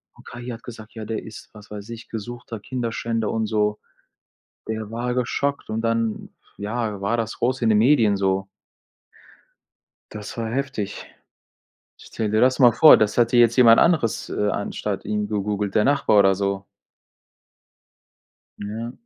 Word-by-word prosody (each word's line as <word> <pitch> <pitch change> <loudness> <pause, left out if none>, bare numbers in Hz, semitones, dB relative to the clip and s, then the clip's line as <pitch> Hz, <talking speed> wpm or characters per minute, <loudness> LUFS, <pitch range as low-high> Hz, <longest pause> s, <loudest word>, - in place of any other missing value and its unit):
Und, - - -18
KI 120 0 -9
hat 115 -1 -7
gesagt: 110 -2 -11
„Ja, 110 -1 -6
der 110 +1 -4
ist“ 110 - -11
was 105 -1 -14
weiß 105 +1 -9
ich, 115 0 -9
gesuchter 115 +1 -7
Kinderschänder 115 -2 -3
und 110 -1 -1
so.“ 105 -1 0 0.9
Der 110 -1 -4
war 120 +2 -3
geschockt 140 +3 -2
und 110 +1 -2
dann 115 -1 -1 0.3
ja, 105 -1 -3
war 105 +4 0
das 115 -1 -3
groß 125 +1 -1
in 115 - +2
den 110 - +4
Medien 115 -3 +4
so. 95 0 0 1.7
Das 105 +1 -8
war 115 -1 -3
heftig. 130 -6 -4 0.9
Stelle 110 -2 -4
dir 110 - +2
das 130 +1 +4
mal 125 -3 +7
vor, 155 +5 +8
das 105 -1 +1
hätte 120 0 +3
jetzt 120 -1 +5
jemand 115 -2 +7
anderes, 155 -10 +1
äh, 105 0 -1
anstatt 100 0 -3
ihm 105 -1 -2
gegoogelt, 105 -1 -2
der 105 - +4
Nachbar 135 -5 +3
oder 95 -1 +5
so? 100 0 -2 1.9
Ja. 110 +3 -5
110 Hz, 155 wpm, -23 LUFS, 105-120 Hz, 1.9 s, vor